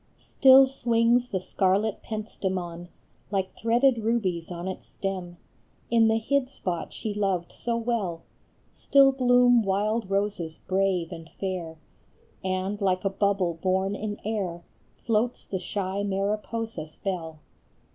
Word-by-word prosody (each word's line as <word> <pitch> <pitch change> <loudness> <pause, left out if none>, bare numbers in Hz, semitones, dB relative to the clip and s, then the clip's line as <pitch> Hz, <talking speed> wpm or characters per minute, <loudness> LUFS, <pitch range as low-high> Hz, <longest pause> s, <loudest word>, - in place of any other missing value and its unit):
TILL 270 0 +9
swings 240 -2 +2
the 195 -5 -2
scarlet 195 +3 0
pentstemon 185 -5 -4 0.4
Like 190 -2 -2
threaded 240 +2 +3
rubies 210 -7 -1
on 175 0 -5
its 190 - -6
stem, 185 -3 -5 0.5
In 230 -1 +5
the 220 0 +3
hid 255 +3 0
spot 180 -10 -4
she 215 - -4
loved 195 -4 -1
so 235 -1 -2
well; 220 -8 -2 0.5
Still 275 -1 +5
bloom 245 -2 +5
wild 210 +1 0
roses 195 -5 -1
brave 190 -3 0
and 165 -1 -9
fair, 180 -4 -4 0.7
And 190 +2 -2
like 185 -1 +1
a 195 - +2
bubble 195 -3 +1
borne 190 +1 +1
in 210 0 -4
air 190 -6 -2 0.4
Floats 230 +2 0
the 190 - -3
shy 190 +1 -3
Mariposa 210 +1 -2
s 155 0 -11
bell. 170 -5 -4
200 Hz, 130 wpm, -26 LUFS, 185-230 Hz, 0.7 s, TILL